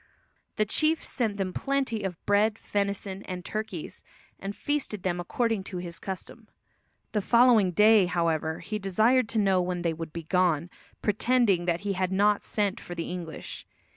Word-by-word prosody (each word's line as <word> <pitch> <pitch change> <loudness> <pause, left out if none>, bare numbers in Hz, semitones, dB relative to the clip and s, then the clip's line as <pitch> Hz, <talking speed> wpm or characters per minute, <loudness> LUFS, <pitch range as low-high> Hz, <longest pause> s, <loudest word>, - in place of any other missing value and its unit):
The 215 - +2
chief 310 +9 +2
sent 220 -6 -2
them 190 -2 -2
plenty 270 -5 -1
of 185 -4 -5
bread, 210 +2 +3
venison 200 -2 -2
and 180 -2 -6
turkeys, 215 -6 -5 0.4
and 195 +1 -5
feasted 285 -9 -2
them 180 -1 -1
according 225 +3 -1
to 185 - -5
his 175 -1 -6
custom. 200 +3 -7 0.6
The 210 - 0
following 235 -3 +5
day, 210 +1 +5
however, 165 -2 0
he 215 +1 -4
desired 220 +5 +3
to 230 - -2
know 195 -3 +3
when 180 -1 -2
they 170 -1 +1
"would 160 0 -6
be 165 +1 -6
gone," 175 -1 +1 0.3
pretending 210 -4 +2
that 170 0 0
he 200 -1 -1
had 185 0 -1
not 205 +2 +3
sent 205 -2 -1
for 175 - -8
the 165 -1 -4
English. 170 -3 -7
195 Hz, 170 wpm, -27 LUFS, 180-215 Hz, 0.6 s, following